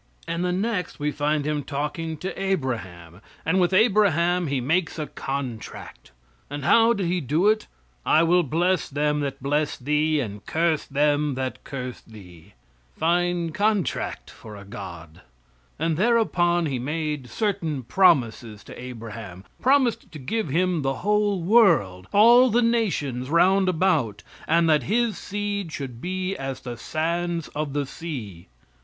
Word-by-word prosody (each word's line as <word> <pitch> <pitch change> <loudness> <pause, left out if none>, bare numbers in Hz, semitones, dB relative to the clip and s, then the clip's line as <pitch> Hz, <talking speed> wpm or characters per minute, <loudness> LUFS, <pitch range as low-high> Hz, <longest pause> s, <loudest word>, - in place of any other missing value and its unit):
And 170 +1 -2
the 180 - 0
next 190 -2 -2
we 150 0 0
find 145 0 0
Him 150 -1 -1
talking 150 +4 -4
to 190 +4 -5
Abraham, 110 - -3 0.2
and 180 +4 +2
with 175 - +2
Abraham 185 -5 +3
He 140 -1 0
makes 160 +7 0
a 155 - -2
contract. 135 -6 -6 0.4
And 145 0 -5
how 230 0 +5
did 200 -4 -2
He 175 +1 0
do 155 - +1
it? 215 0 +2 0.4
"I 155 - +4
will 175 +2 +4
bless 175 +4 0
them 150 +1 0
that 135 -2 -4
bless 145 +2 0
thee, 150 +3 +1
and 105 -6 -5
curse 160 -1 +1
them 145 0 +1
that 130 0 -4
curse 130 -3 -6
thee." 95 -4 -15 0.4
Fine 175 0 +1
contract 205 +1 -1
for 110 -2 -12
a 100 -1 -11
God. 85 -5 -9 0.6
And 160 0 0
thereupon 180 -6 +2
He 135 -5 -2
made 150 -1 -3
certain 165 - -2
promises 115 - +2
to - - -11
Abraham 110 -6 -8 0.2
promised 255 -4 +2
to - - -7
give 185 - -3
him 175 +2 +1
the 135 0 -1
whole 205 -3 +1
world, 165 - +3
all 240 +5 +7
the 240 +2 +2
nations 160 - 0
round 185 +4 +4
about, 160 - +1 0.2
and 165 +1 +3
that 155 -2 +4
his 235 0 +1
seed 205 -3 -4
should 130 -6 -6
be 185 +1 -2
as 135 -1 -5
the 120 -2 -6
sands 170 +5 -2
of 150 -2 -4
the 145 -1 -1
sea. 120 - -7
155 Hz, 150 wpm, -24 LUFS, 130-185 Hz, 0.6 s, all